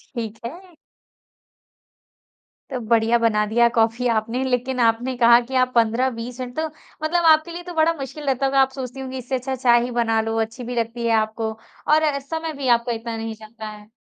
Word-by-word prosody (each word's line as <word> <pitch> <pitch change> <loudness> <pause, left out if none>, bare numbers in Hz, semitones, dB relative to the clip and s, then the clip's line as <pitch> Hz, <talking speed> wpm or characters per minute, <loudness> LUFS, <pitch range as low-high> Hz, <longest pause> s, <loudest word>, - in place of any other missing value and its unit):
ठीक 225 -1 -5
है। 350 +7 -9 1.9
तो 260 -3 -3
बढ़िया 230 +1 +2
बना 215 -2 +2
दिया 235 +3 +3
कॉफ़ी 230 +2 +2
आपने, 230 +3 0
लेकिन 255 0 -1
आपने 235 +2 +2
कहा 235 0 +7
कि 255 +2 -7
आप 255 0 +3
15-20 235 +1 0
मिनट 250 0 -6
तो 320 - 0 0.4
मतलब 340 +2 +1
आपके 315 +1 +5
लिए 350 +1 -7
तो 355 0 -8
बड़ा 325 +1 +3
मुश्किल 295 0 -7
रहता 270 0 +1
होगा, 270 0 +2
आप 265 - +3
सोचती 265 -1 -7
होंगी, 260 0 -5
इससे 255 +1 -3
अच्छा 260 +1 -3
चाय 240 -2 +4
ही 250 - -4
बना 225 -1 +1
लो, 225 0 -2
अच्छी 225 +3 -5
भी 245 +1 -5
लगती 235 0 -2
है 230 - +2
आपको, 220 0 -1 0.4
और 310 +1 +4
अ, 290 -2 +1
समय 320 +3 -4
भी 275 -3 -4
आपका 235 +1 -5
इतना 230 0 -4
नहीं 225 0 -4
जाता 215 0 -10
है। 210 0 -12
245 Hz, 200 wpm, -22 LUFS, 225-270 Hz, 1.9 s, कहा